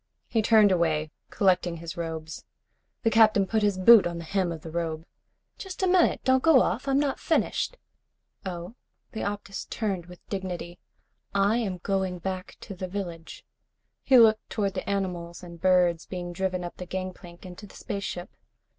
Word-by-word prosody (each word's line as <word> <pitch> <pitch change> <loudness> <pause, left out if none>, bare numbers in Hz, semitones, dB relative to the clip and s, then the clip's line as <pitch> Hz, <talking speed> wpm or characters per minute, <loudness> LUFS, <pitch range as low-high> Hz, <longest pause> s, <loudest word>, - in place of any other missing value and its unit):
He 225 - +1
turned 215 -2 +5
away, 160 -4 +1 0.2
collecting 180 -3 +1
his 165 0 -7
robes. 160 -2 -5 0.6
The 225 - +2
Captain 215 -3 +5
put 220 +3 0
his 205 -2 +1
boot 205 +1 +7
on 170 -1 -5
the 170 - -6
hem 185 +1 -1
of 160 -2 -6
the 160 - -8
robe. 165 -1 -3 0.5
"Just 380 -1 -6
a - - +3
minute. 360 -1 +3
Don't 260 0 +3
go 320 -3 +6
off. 240 +9 -2
I'm 270 0 +2
not 285 -2 0
finished." - - 0 0.7
"Oh?" 175 +1 -6 0.4
The 220 - -6
Optus 205 -1 -4
turned 195 -6 -3
with 180 0 -15
dignity. 180 -3 -5 0.6
"I 200 +3 +3
am 200 -6 -2
going 190 -2 -1
back 185 +1 -5
to - - -8
the 185 0 -5
village." 175 -4 -7 0.6
He 265 - +5
looked 220 -2 +5
toward 200 -3 -1
the 185 - -5
animals 180 -3 -3
and 170 -2 -11
birds 180 -3 +3
being 175 -1 -5
driven 185 0 -2
up 175 - -7
the 180 - -7
gangplank 185 -1 -7
into 185 +3 -10
the - - -17
spaceship. 195 -3 -5
185 Hz, 170 wpm, -27 LUFS, 175-205 Hz, 0.7 s, boot